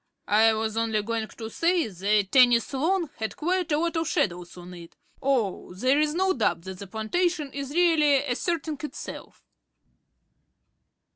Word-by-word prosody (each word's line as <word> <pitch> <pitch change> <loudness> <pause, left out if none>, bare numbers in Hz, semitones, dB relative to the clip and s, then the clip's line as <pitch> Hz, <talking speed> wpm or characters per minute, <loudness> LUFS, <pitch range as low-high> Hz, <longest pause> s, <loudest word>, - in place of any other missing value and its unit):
"I 220 +2 +5
was 220 0 -2
only 220 -2 0
going 225 0 -2
to 220 0 -8
say 340 -4 +1
the 205 +2 +1
tennis 245 +4 +4
lawn 325 +3 0
had 220 -1 -4
quite 355 +1 -1
a 295 - +3
lot 335 +2 -1
of 325 -1 -1
shadows 175 - -2
on 180 +1 -10
it. 170 -1 -12 0.3
Oh, 235 -9 -1
there's 285 - +2
no 380 +1 +2
doubt 220 -8 0
that 190 0 -8
the 200 - -8
plantation 290 - -1
is 275 -1 -5
really 305 -4 +3
asserting 310 +3 -2
itself." 300 - -8
260 Hz, 150 wpm, -26 LUFS, 215-320 Hz, 0.3 s, I